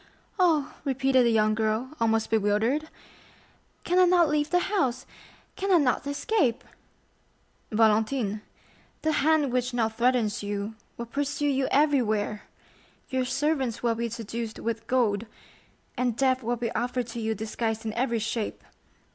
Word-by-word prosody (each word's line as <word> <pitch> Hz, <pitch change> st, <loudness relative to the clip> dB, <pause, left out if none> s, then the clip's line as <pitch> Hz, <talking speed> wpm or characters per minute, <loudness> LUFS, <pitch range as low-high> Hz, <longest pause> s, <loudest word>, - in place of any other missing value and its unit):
"Oh," 320 Hz, -6 st, +2 dB
repeated 270 Hz, -2 st, +2 dB
the 235 Hz, -, +3 dB
young 215 Hz, -1 st, +3 dB
girl, 220 Hz, +3 st, -1 dB
almost 225 Hz, -1 st, +1 dB
bewildered, 225 Hz, +8 st, +1 dB, 0.9 s
"can 360 Hz, +1 st, +2 dB
I 365 Hz, -, +7 dB
not 350 Hz, -3 st, +4 dB
leave 300 Hz, 0 st, +1 dB
the 355 Hz, -, +3 dB
house?—can 380 Hz, -, -3 dB
I 360 Hz, -, +7 dB
not 280 Hz, -2 st, +1 dB
escape?" 285 Hz, -, 0 dB, 1.1 s
"Valentine, 220 Hz, 0 st, +2 dB, 0.6 s
the 315 Hz, -, +2 dB
hand 300 Hz, -3 st, +2 dB
which 250 Hz, 0 st, 0 dB
now 225 Hz, -2 st, +2 dB
threatens 235 Hz, -2 st, +1 dB
you 205 Hz, +1 st, -3 dB, 0.2 s
will 235 Hz, -, -4 dB
pursue 285 Hz, +4 st, -1 dB
you 270 Hz, -1 st, +1 dB
everywhere; 235 Hz, -8 st, +1 dB, 0.7 s
your 260 Hz, -1 st, 0 dB
servants 270 Hz, -2 st, -1 dB
will 235 Hz, -1 st, +2 dB
be 235 Hz, +1 st, -3 dB
seduced 230 Hz, 0 st, -5 dB
with 225 Hz, 0 st, -4 dB
gold, 230 Hz, -4 st, +1 dB, 0.7 s
and 245 Hz, -2 st, -1 dB
death 260 Hz, -1 st, +2 dB
will 240 Hz, +1 st, -1 dB
be 235 Hz, -1 st, -3 dB
offered 245 Hz, +2 st, -1 dB
to 235 Hz, +1 st, -6 dB
you 220 Hz, 0 st, -1 dB
disguised 220 Hz, +1 st, -3 dB
in 220 Hz, -, -2 dB
every 235 Hz, 0 st, 0 dB
shape. 225 Hz, 0 st, -3 dB
245 Hz, 140 wpm, -27 LUFS, 220-275 Hz, 1.1 s, I